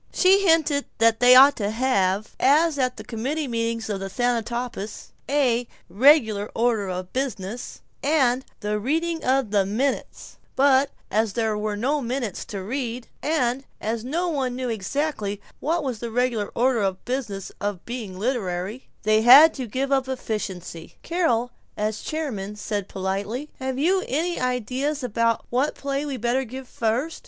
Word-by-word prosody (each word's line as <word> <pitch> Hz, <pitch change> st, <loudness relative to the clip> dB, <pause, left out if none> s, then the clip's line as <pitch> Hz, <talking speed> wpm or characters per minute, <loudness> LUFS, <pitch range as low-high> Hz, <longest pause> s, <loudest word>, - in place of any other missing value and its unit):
She 390 Hz, +1 st, +4 dB
hinted 305 Hz, -4 st, +3 dB
that 225 Hz, 0 st, +4 dB
they 250 Hz, +1 st, +7 dB
ought 275 Hz, +3 st, +8 dB
to 205 Hz, -2 st, -1 dB
have 215 Hz, -4 st, 0 dB
(as 295 Hz, +2 st, +4 dB
at 255 Hz, -1 st, 0 dB
the -, -, -7 dB
committee 265 Hz, +6 st, -3 dB
meetings 230 Hz, -1 st, -2 dB
of 205 Hz, -2 st, -2 dB
the 195 Hz, 0 st, -5 dB
Thanatopsis) 235 Hz, -2 st, -3 dB, 0.2 s
a 250 Hz, -4 st, +2 dB, 0.2 s
"regular 220 Hz, -, +4 dB
order 225 Hz, -4 st, +1 dB
of 185 Hz, 0 st, -5 dB
business," 240 Hz, -4 st, -4 dB, 0.2 s
and 265 Hz, -4 st, +2 dB, 0.2 s
"the 210 Hz, 0 st, -1 dB
reading 325 Hz, +8 st, -1 dB
of 260 Hz, -4 st, +1 dB
the 205 Hz, -2 st, +3 dB
minutes," 235 Hz, +8 st, -3 dB, 0.2 s
but 275 Hz, 0 st, +4 dB, 0.2 s
as 215 Hz, 0 st, +1 dB
there 220 Hz, -1 st, 0 dB
were 210 Hz, 0 st, -2 dB
no 280 Hz, +7 st, 0 dB
minutes 240 Hz, -4 st, -3 dB
to 195 Hz, -3 st, -6 dB
read, 240 Hz, +1 st, -4 dB
and 270 Hz, -4 st, 0 dB, 0.2 s
as 225 Hz, +1 st, -3 dB
no 330 Hz, +8 st, -1 dB
one 270 Hz, -6 st, -1 dB
knew 255 Hz, -1 st, -3 dB
exactly 220 Hz, -1 st, -2 dB, 0.2 s
what 330 Hz, +2 st, 0 dB
was 255 Hz, -5 st, -3 dB
the 235 Hz, -, -4 dB
regular 235 Hz, -2 st, 0 dB
order 250 Hz, 0 st, +2 dB
of 195 Hz, -2 st, +1 dB
the 245 Hz, -, -9 dB
business 215 Hz, -8 st, -3 dB
of 205 Hz, -3 st, -3 dB
being 225 Hz, -6 st, -6 dB
literary, 205 Hz, -1 st, -3 dB, 0.2 s
they 215 Hz, 0 st, +3 dB
had 275 Hz, +8 st, +9 dB
to 255 Hz, -3 st, -5 dB
give 265 Hz, +5 st, -2 dB
up 265 Hz, -1 st, +2 dB
efficiency. 195 Hz, -9 st, -5 dB
Carol, 250 Hz, -9 st, 0 dB, 0.3 s
as 215 Hz, +1 st, -2 dB
chairman, 230 Hz, -11 st, -4 dB
said 205 Hz, -1 st, -3 dB
politely, 200 Hz, +9 st, -3 dB
"Have 260 Hz, -1 st, -3 dB
you 370 Hz, +7 st, +2 dB
any 335 Hz, +6 st, -1 dB
ideas 255 Hz, +4 st, -1 dB
about 230 Hz, -1 st, 0 dB
what 260 Hz, +5 st, +1 dB
play 280 Hz, +1 st, -3 dB
we'd 265 Hz, -5 st, -4 dB
better 245 Hz, +3 st, +1 dB
give 260 Hz, +2 st, -8 dB
first?" 240 Hz, +9 st, -1 dB
245 Hz, 160 wpm, -24 LUFS, 215-275 Hz, 0.3 s, had